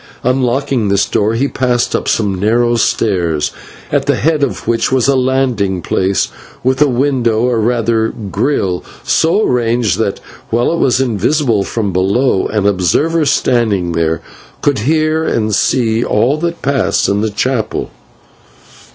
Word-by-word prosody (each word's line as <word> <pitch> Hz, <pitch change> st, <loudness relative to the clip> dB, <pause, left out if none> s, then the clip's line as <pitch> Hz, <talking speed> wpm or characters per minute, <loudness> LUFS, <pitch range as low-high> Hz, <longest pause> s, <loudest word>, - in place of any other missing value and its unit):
Unlocking 130 Hz, -1 st, 0 dB
this 100 Hz, 0 st, +2 dB
door, 110 Hz, +2 st, 0 dB
they 135 Hz, +4 st, +1 dB
passed 125 Hz, -3 st, 0 dB
up -, -, -2 dB
some 105 Hz, -3 st, +1 dB
narrow 115 Hz, +5 st, +1 dB
stairs, 90 Hz, -9 st, 0 dB, 0.4 s
at -, -, 0 dB
the -, -, +3 dB
head 155 Hz, -1 st, 0 dB
of 140 Hz, -, -2 dB
which 115 Hz, +2 st, 0 dB
was 130 Hz, -2 st, +2 dB
a 140 Hz, -, +3 dB
landing 125 Hz, -7 st, 0 dB
place 95 Hz, 0 st, 0 dB, 0.3 s
with 130 Hz, +2 st, 0 dB
a 150 Hz, -, +6 dB
window, 125 Hz, -4 st, +1 dB
or 120 Hz, -1 st, +1 dB
rather 115 Hz, 0 st, +1 dB
/grille/, 100 Hz, -3 st, -2 dB, 0.2 s
so 170 Hz, +7 st, +2 dB
arranged 115 Hz, -5 st, 0 dB
that, 100 Hz, -3 st, -1 dB, 0.3 s
while 120 Hz, +7 st, +1 dB
it 170 Hz, -, -2 dB
was 125 Hz, -1 st, +2 dB
invisible 120 Hz, -, +1 dB
from 100 Hz, -2 st, -3 dB
below, 95 Hz, +4 st, +1 dB
an 105 Hz, -2 st, -1 dB
observer 140 Hz, -, +1 dB
standing 110 Hz, -10 st, +1 dB
there 80 Hz, 0 st, -1 dB, 0.4 s
could 145 Hz, -5 st, +1 dB
hear 155 Hz, 0 st, +1 dB
and 110 Hz, -7 st, -1 dB
see 115 Hz, +1 st, +1 dB
all 120 Hz, +7 st, +1 dB
that 170 Hz, +1 st, -4 dB
passed 140 Hz, -1 st, +1 dB
in 100 Hz, +1 st, 0 dB
the 110 Hz, -, 0 dB
chapel. 110 Hz, +1 st, -2 dB
115 Hz, 150 wpm, -14 LUFS, 100-130 Hz, 0.4 s, a